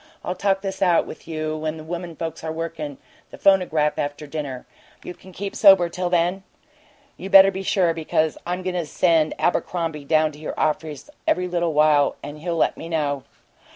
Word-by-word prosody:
I'll 180 - -1
talk 195 +1 0
this 195 0 -5
out 175 -3 +3
with - - -11
you 155 -1 -3
when 155 0 -3
the 155 - -9
women 170 +1 -6
folks 165 0 -6
are 160 - -3
workin' 160 -3 -5 0.3
the - - -12
phonograph, 175 -6 +2
after 145 +1 -3
dinner. 140 -4 -6 0.4
Can - - -9
you 185 - -16
keep 195 +2 -6
sober 195 -4 +6
till 180 +1 -3
then? 175 +2 +1 0.8
You 190 - -7
better 195 0 +8
be 190 0 -5
sure, 185 -3 +2
because 160 -1 0
I'm 180 +1 -3
going 185 0 -2
to 175 -3 -2
send 160 0 +2
Abercrombie 160 -1 -1
down 155 +1 +2
to 150 - -14
your 155 - -6
office 155 - -2 0.2
every 180 0 +1
little 175 -2 -1
while, 150 -1 +4
and 145 +1 -8
he'll 170 +1 -3
let - - +1
me 165 - -8
know." 145 -4 -1
165 Hz, 190 wpm, -23 LUFS, 155-180 Hz, 0.8 s, better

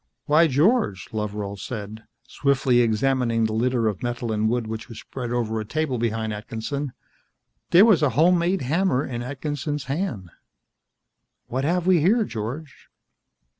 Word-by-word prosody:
"Why, 160 +2 +5
George," 150 - +1
Loveral 105 -2 -3
said, 110 0 -7 0.2
swiftly 135 -3 +2
examining 120 0 +1
the 110 -1 0
litter 120 0 +1
of 105 -3 -2
metal 120 -1 -3
and 110 0 +1
wood 120 0 0
which 110 +2 -6
was 115 -2 -9
spread 125 -1 -6
over 115 -2 -1
a - - -3
table 135 +2 -2
behind 110 -1 -1
Atkinson. 115 +6 -4 0.8
There 185 +5 +7
was 210 -9 +5
a 150 - +3
home 175 +3 +5
made 175 -1 0
hammer 145 0 +1
in 120 -2 -4
Atkinson's 145 +2 -4
hand. 130 - -3 1.1
"What 130 +3 -2
have 175 +2 +1
we 185 -2 +5
here, 215 +8 +4
George?" 130 - -6
125 Hz, 150 wpm, -24 LUFS, 110-150 Hz, 1.1 s, There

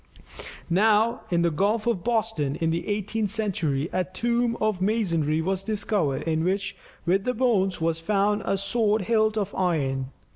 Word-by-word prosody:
Now, 215 +6 +3
in 170 -1 +2
the 170 - +2
Gulf 205 +7 +1
of 225 -8 0
Boston 220 - 0
in 165 0 0
the 170 +1 -2
eighteenth 210 +1 -1
century, 175 -9 -1
a 185 - +1
tomb 235 +6 -1
of 215 -4 0
masonry 170 -7 +1
was 190 +2 -1
discovered, 200 -8 -1
in 160 0 0
which, 195 +2 -1 0.3
with 190 +3 +2
the 250 - -1
bones, 210 -7 +1
was 165 0 0
found 205 +4 +1
a 195 - 0
sword 210 +1 +1
hilt 220 +1 +2
of 205 -1 -2
iron. 140 -8 0
195 Hz, 160 wpm, -25 LUFS, 170-215 Hz, 0.3 s, Now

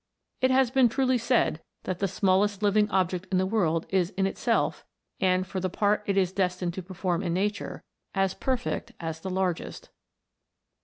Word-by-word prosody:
It 260 - +4
has 260 -2 +3
been 260 -2 +5
truly 260 +1 +1
said, 230 -9 +1 0.2
that 185 -1 -3
the 195 - +1
smallest 195 +2 +1
living 210 +1 +3
object 185 -1 0
in 185 - +2
the 185 - +2
world 170 -6 +1
is 185 -3 +1
in 190 - +2
itself, 195 - 0 0.4
and 185 0 +2
for 190 0 -4
the 185 0 -1
part 205 +3 +1
it 200 -1 +1
is 185 -2 +2
destined 180 -2 -1
to 190 - -5
perform 180 -1 -2
in 170 -2 -1
nature, 205 +3 -2 0.3
as 195 -1 +2
perfect 245 -2 -2
as 160 -1 -4
the 190 - -5
largest. 185 -2 -2
190 Hz, 175 wpm, -27 LUFS, 185-210 Hz, 0.4 s, been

